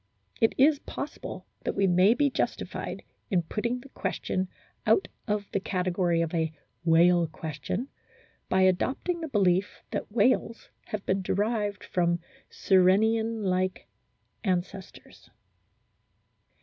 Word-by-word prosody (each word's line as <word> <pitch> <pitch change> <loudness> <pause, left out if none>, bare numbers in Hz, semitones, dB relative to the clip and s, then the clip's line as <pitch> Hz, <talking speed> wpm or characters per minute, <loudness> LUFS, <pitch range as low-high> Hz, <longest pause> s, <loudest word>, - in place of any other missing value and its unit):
It 225 - +3
is 290 +2 +5
possible - - -7 0.2
that - - -2
we 195 - +3
may 185 +5 +5
be 285 0 +2
justified - - -3 0.3
in 180 -3 +2
putting 235 +8 -2
the 275 - -14
question 185 -6 -2 0.4
out 385 - +4 0.2
of 210 -1 -1
the - - 0
category 180 -3 0
of 165 - -4
a 160 -2 0 0.3
"whale 170 +1 +5
question" 160 - -4 0.6
by 190 - +3
adopting 260 - +1
the 320 - -3
belief 195 - +1
that - - -4
whales 230 +1 +1 0.2
have 215 -2 -5
been 190 +1 +1
derived 205 +1 -1
from 175 -1 +1 0.3
Sirenian 220 +4 +3
like 185 0 0 0.6
ancestors. 190 0 -4
190 Hz, 120 wpm, -28 LUFS, 180-225 Hz, 0.6 s, is